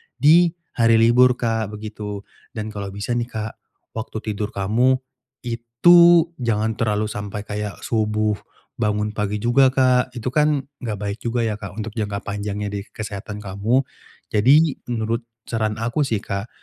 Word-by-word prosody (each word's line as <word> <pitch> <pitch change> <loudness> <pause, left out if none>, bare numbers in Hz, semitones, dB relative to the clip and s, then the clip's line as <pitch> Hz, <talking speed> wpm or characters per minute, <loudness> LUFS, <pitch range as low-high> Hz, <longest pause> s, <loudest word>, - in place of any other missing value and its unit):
di 165 +3 +5 0.2
hari 115 -1 +4
libur 120 +3 +5
Kak, 115 -3 -1
begitu. 105 -1 -6 0.3
Dan 110 -1 -4
kalau 100 -1 -5
bisa 100 +4 -5
nih 120 0 0
Kak, 110 -2 -4 0.4
waktu 110 -1 -5
tidur 105 0 -4
kamu, 115 +7 +2 0.5
itu 165 +9 +5
jangan 110 -2 0
terlalu 105 -1 0
sampai 105 0 -5
kayak 105 -1 -5
subuh, 105 -2 0 0.4
bangun 105 -1 0
pagi 105 -1 -3
juga 130 +3 +5
Kak, 130 -1 +3
itu 120 +1 -3
kan 150 -1 +2 0.2
enggak 115 -4 -3
baik 100 +2 -3
juga 120 0 -1
ya 110 -2 -2
Kak 100 -3 -8
untuk 110 0 -5
jangka 100 -1 -3
panjangnya 105 0 -4
di 100 - -3 0.2
kesehatan 105 0 -6
kamu. 105 +7 +1 0.5
Jadi, 135 +8 +4
menurut 115 -1 -1 0.2
saran 110 -2 -1
aku 120 +6 0
sih 110 -5 -1
Kak, 100 0 -4
110 Hz, 150 wpm, -22 LUFS, 105-120 Hz, 0.5 s, di